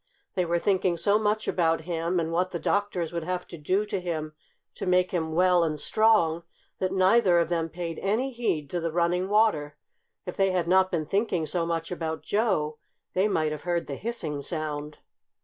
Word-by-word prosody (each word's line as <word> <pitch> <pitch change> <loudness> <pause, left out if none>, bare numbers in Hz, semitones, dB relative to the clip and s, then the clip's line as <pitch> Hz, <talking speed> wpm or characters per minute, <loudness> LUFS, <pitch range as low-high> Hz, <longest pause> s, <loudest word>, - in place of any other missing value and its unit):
They 180 - 0
were 170 0 +1
thinking 185 -1 +1
so 205 +4 +3
much 215 0 0
about 165 -2 +1
him, 170 +1 -1
and 165 0 -2
what 180 +2 +1
the 175 - -3
doctors 180 -1 -1
would 170 -1 -2
have 180 +1 -3
to - - -7
do 185 +7 0
to 205 -2 -2
him 155 -3 -3 0.4
to - - -6
make 180 0 +3
him 160 -3 -1
well 180 0 +4
and 155 -2 -1
strong, 170 -3 +3 0.4
that 185 0 0
neither 190 0 +4
of 170 -1 +2
them 165 -2 -1
paid 165 -1 -5
any 225 +7 0
heed 230 - -1
to 175 - -1
the 165 -1 -2
running 175 +3 +1
water. 160 -9 +2 0.5
If 180 - -5
they 195 0 +3
had 175 -2 0
not 185 +1 +4
been 165 -4 -1
thinking 195 -2 0
so 165 +2 -1
much 165 0 -2
about 160 -2 -3
Joe 185 -9 0 0.3
they 190 +3 +2
might 155 -6 0
have 150 -1 -5
heard 175 -1 -1
the 140 - -6
hissing 165 - -4
sound. 150 -1 -4
175 Hz, 200 wpm, -27 LUFS, 160-190 Hz, 0.5 s, well